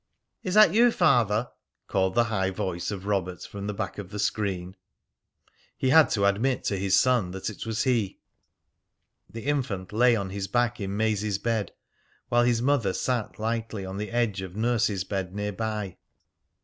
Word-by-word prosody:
"Is 185 Hz, -2 st, -3 dB
that 215 Hz, -5 st, +7 dB
you, 235 Hz, +2 st, +5 dB
Father?" 120 Hz, -, +2 dB, 0.3 s
called 95 Hz, -1 st, 0 dB
the 120 Hz, -, +5 dB
high 100 Hz, -5 st, 0 dB
voice 90 Hz, -2 st, -3 dB
of 100 Hz, -2 st, -5 dB
Robert 95 Hz, -3 st, -2 dB
from 100 Hz, 0 st, -7 dB
the 105 Hz, -, -2 dB
back 100 Hz, -1 st, -4 dB
of 95 Hz, -3 st, -7 dB
the 105 Hz, -, -7 dB
screen. 95 Hz, -3 st, -2 dB, 1.0 s
He 130 Hz, -, 0 dB
had 160 Hz, -2 st, +7 dB
to 100 Hz, -2 st, +1 dB
admit 115 Hz, +7 st, +1 dB
to 100 Hz, -, -1 dB
his 95 Hz, 0 st, +3 dB
son 125 Hz, -8 st, +2 dB
that 95 Hz, +3 st, -4 dB
it 105 Hz, -, -8 dB
was 110 Hz, 0 st, -1 dB
he. 115 Hz, -7 st, 0 dB, 1.1 s
The 115 Hz, +2 st, -8 dB
infant 115 Hz, -11 st, -2 dB
lay 120 Hz, +2 st, +5 dB
on 100 Hz, -3 st, -3 dB
his 100 Hz, 0 st, -4 dB
back 120 Hz, +1 st, 0 dB
in 100 Hz, 0 st, -3 dB
Maisie's 105 Hz, -2 st, 0 dB
bed, 110 Hz, 0 st, -1 dB, 0.6 s
while 120 Hz, 0 st, +3 dB
his 120 Hz, -1 st, +2 dB
mother 125 Hz, -8 st, +2 dB
sat 120 Hz, -1 st, -2 dB
lightly 110 Hz, -2 st, -3 dB
on 95 Hz, +1 st, -6 dB
the 105 Hz, +1 st, -4 dB
edge 115 Hz, -5 st, 0 dB
of 95 Hz, -1 st, -8 dB
nurse's 110 Hz, -3 st, +1 dB
bed 95 Hz, -1 st, -4 dB
near 105 Hz, 0 st, -2 dB
by. 105 Hz, -3 st, -4 dB
105 Hz, 175 wpm, -26 LUFS, 95-120 Hz, 1.1 s, that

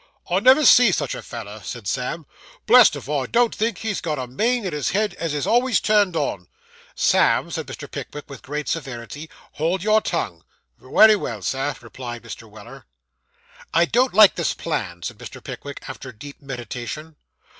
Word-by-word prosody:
'I 180 Hz, -, +3 dB
never 260 Hz, +7 st, +6 dB
see 245 Hz, -3 st, +7 dB
such -, -, -1 dB
a -, -, -6 dB
feller,' 110 Hz, -3 st, -8 dB
said 115 Hz, +1 st, -7 dB
Sam, 135 Hz, -, -3 dB, 0.4 s
'Blessed -, -, +7 dB
if -, -, -8 dB
I 140 Hz, -3 st, -1 dB
don't 240 Hz, -1 st, +2 dB
think 225 Hz, -2 st, -1 dB
he's 220 Hz, 0 st, -3 dB
got 155 Hz, -3 st, -2 dB
a 130 Hz, -, -3 dB
main 225 Hz, -, 0 dB
in 180 Hz, -, -3 dB
his 150 Hz, -1 st, -1 dB
head 210 Hz, +2 st, 0 dB
as 165 Hz, -3 st, -2 dB
is 145 Hz, -, -1 dB
always 245 Hz, +2 st, +3 dB
turned 205 Hz, -4 st, +2 dB
on.' 100 Hz, -, -2 dB, 0.5 s
'Sam,' -, -, +3 dB
said -, -, -4 dB
Mr. -, -, -7 dB
Pickwick, 150 Hz, -, -7 dB
with 140 Hz, -4 st, -10 dB
great 150 Hz, +2 st, -5 dB
severity, 145 Hz, 0 st, -5 dB, 0.2 s
'hold 170 Hz, +4 st, -1 dB
your 215 Hz, +1 st, +4 dB
tongue.' -, -, -3 dB, 0.4 s
'Wery 220 Hz, 0 st, +6 dB
well, 115 Hz, -, -5 dB
sir,' 135 Hz, +4 st, -1 dB
replied 120 Hz, 0 st, -8 dB
Mr. -, -, -10 dB
Weller. -, -, -13 dB, 0.9 s
'I 170 Hz, +1 st, +5 dB
don't 250 Hz, +8 st, +2 dB
like 215 Hz, -2 st, +8 dB
this 170 Hz, -, -1 dB
plan,' 95 Hz, -, -4 dB
said -, -, -6 dB
Mr. -, -, -9 dB
Pickwick, 140 Hz, 0 st, -8 dB
after 130 Hz, -, -8 dB
deep 140 Hz, +5 st, -12 dB
meditation. 135 Hz, +3 st, -7 dB
150 Hz, 175 wpm, -22 LUFS, 125-210 Hz, 0.9 s, like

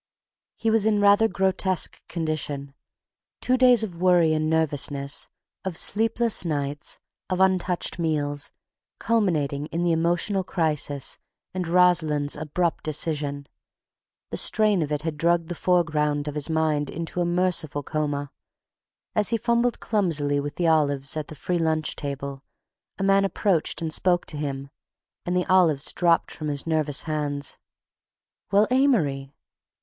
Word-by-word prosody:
He 225 Hz, -1 st, 0 dB
was 220 Hz, -1 st, +4 dB
in 210 Hz, -1 st, +2 dB
rather 205 Hz, +2 st, +5 dB
grotesque 190 Hz, -2 st, 0 dB
condition: 150 Hz, -4 st, -3 dB, 0.7 s
two 255 Hz, -, +1 dB
days 250 Hz, -2 st, +5 dB
of 190 Hz, -6 st, -5 dB
worry 175 Hz, -3 st, +4 dB
and 155 Hz, 0 st, 0 dB
nervousness, 145 Hz, -3 st, +1 dB, 0.3 s
of 185 Hz, -4 st, -4 dB
sleepless 225 Hz, +1 st, +2 dB
nights, 145 Hz, -3 st, -3 dB, 0.3 s
of 185 Hz, -1 st, -1 dB
untouched 185 Hz, -2 st, +1 dB
meals, 145 Hz, -3 st, -1 dB, 0.5 s
culminating 155 Hz, -10 st, 0 dB
in 170 Hz, +2 st, -3 dB
the 175 Hz, -, +2 dB
emotional 175 Hz, +4 st, +1 dB
crisis 150 Hz, -6 st, -1 dB, 0.3 s
and 180 Hz, -2 st, -3 dB
Rosalind's 165 Hz, -5 st, +2 dB
abrupt 160 Hz, +3 st, -2 dB
decision—the 150 Hz, -2 st, -5 dB
strain 210 Hz, -4 st, +2 dB
of 150 Hz, -1 st, -3 dB
it 150 Hz, 0 st, -2 dB
had 160 Hz, -2 st, -3 dB
drugged 170 Hz, +1 st, +1 dB
the -, -, -2 dB
foreground 155 Hz, -5 st, 0 dB
of 150 Hz, -, -3 dB
his 150 Hz, +1 st, -2 dB
mind 155 Hz, -2 st, 0 dB
into 170 Hz, +2 st, -4 dB
a -, -, +1 dB
merciful 175 Hz, -4 st, 0 dB
coma. 145 Hz, -2 st, -3 dB, 0.8 s
As 210 Hz, -, +2 dB
he 230 Hz, -, +1 dB
fumbled 235 Hz, +1 st, 0 dB
clumsily 155 Hz, -9 st, 0 dB
with 145 Hz, 0 st, -5 dB
the 175 Hz, -, -1 dB
olives 145 Hz, -4 st, +2 dB
at 155 Hz, -1 st, -4 dB
the 155 Hz, -, -10 dB
free 175 Hz, +4 st, -2 dB
lunch 160 Hz, -1 st, 0 dB
table, 140 Hz, -1 st, -6 dB, 0.5 s
a 195 Hz, -, -3 dB
man 195 Hz, 0 st, +4 dB
approached 190 Hz, -4 st, 0 dB
and 160 Hz, -1 st, -2 dB
spoke 175 Hz, 0 st, +2 dB
to 150 Hz, -, -6 dB
him, 140 Hz, -1 st, -5 dB, 0.6 s
and 180 Hz, +1 st, 0 dB
the 180 Hz, -, 0 dB
olives 165 Hz, -6 st, +2 dB
dropped 170 Hz, -2 st, +2 dB
from 155 Hz, -, -6 dB
his 145 Hz, -2 st, -2 dB
nervous 155 Hz, -3 st, 0 dB
hands. 145 Hz, -2 st, -3 dB, 0.9 s
"Well, 205 Hz, +1 st, +5 dB
Amory..." 155 Hz, -, +1 dB
160 Hz, 140 wpm, -24 LUFS, 145-185 Hz, 0.9 s, rather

